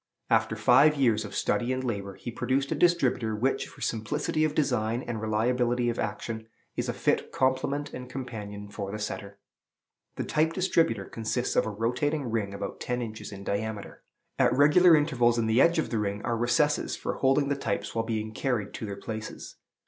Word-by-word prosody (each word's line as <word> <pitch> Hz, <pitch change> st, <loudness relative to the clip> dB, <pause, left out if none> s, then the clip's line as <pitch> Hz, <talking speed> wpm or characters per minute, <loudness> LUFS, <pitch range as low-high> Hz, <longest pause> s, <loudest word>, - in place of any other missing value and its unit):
After -, -, +3 dB
five 150 Hz, +2 st, +5 dB
years 115 Hz, -6 st, +2 dB
of 100 Hz, -, -8 dB
study 120 Hz, +1 st, 0 dB
and 130 Hz, 0 st, -1 dB
labor, 100 Hz, -5 st, -3 dB
he 120 Hz, -, -7 dB
produced 135 Hz, +3 st, -1 dB
a -, -, +3 dB
distributer 130 Hz, -10 st, +2 dB
which, 130 Hz, +5 st, 0 dB
for -, -, -15 dB
simplicity 115 Hz, +7 st, -1 dB
of 155 Hz, -1 st, 0 dB
design 125 Hz, -4 st, 0 dB
and 115 Hz, -3 st, -4 dB
reliability 120 Hz, +2 st, +1 dB
of 120 Hz, -, -3 dB
action, 110 Hz, -1 st, -4 dB, 0.3 s
is -, -, -2 dB
a -, -, 0 dB
fit -, -, 0 dB
complement 135 Hz, +2 st, 0 dB
and 125 Hz, 0 st, -7 dB
companion 105 Hz, -6 st, -6 dB
for 100 Hz, -1 st, -5 dB
the 105 Hz, -, -4 dB
setter. 100 Hz, -1 st, -5 dB, 0.8 s
The -, -, -2 dB
Type 160 Hz, +1 st, +1 dB
distributer 165 Hz, -, +1 dB
consists 115 Hz, +4 st, -2 dB
of -, -, +3 dB
a -, -, -1 dB
rotating 125 Hz, +5 st, -1 dB
ring, 105 Hz, -3 st, -1 dB
about 100 Hz, -, -5 dB
ten 125 Hz, 0 st, -2 dB
inches 110 Hz, -2 st, -6 dB
in 100 Hz, -1 st, -8 dB
diameter. 105 Hz, +1 st, -4 dB, 0.4 s
At 125 Hz, -2 st, +4 dB
regular 150 Hz, +6 st, +6 dB
intervals 125 Hz, -6 st, +2 dB
in 115 Hz, -, +1 dB
the 110 Hz, +3 st, +4 dB
edge 170 Hz, +1 st, +4 dB
of 160 Hz, -, -1 dB
the 115 Hz, -, 0 dB
ring 100 Hz, 0 st, -2 dB
are 120 Hz, -, 0 dB
recesses 145 Hz, +6 st, +1 dB
for -, -, -4 dB
holding 140 Hz, +1 st, +2 dB
the 140 Hz, -, +1 dB
types 140 Hz, -, -3 dB
while 115 Hz, -, 0 dB
being 110 Hz, -1 st, -3 dB
carried 110 Hz, -4 st, -1 dB
to 110 Hz, -, -5 dB
their 100 Hz, -, -4 dB
places. 110 Hz, -1 st, -7 dB
120 Hz, 190 wpm, -28 LUFS, 110-135 Hz, 0.8 s, regular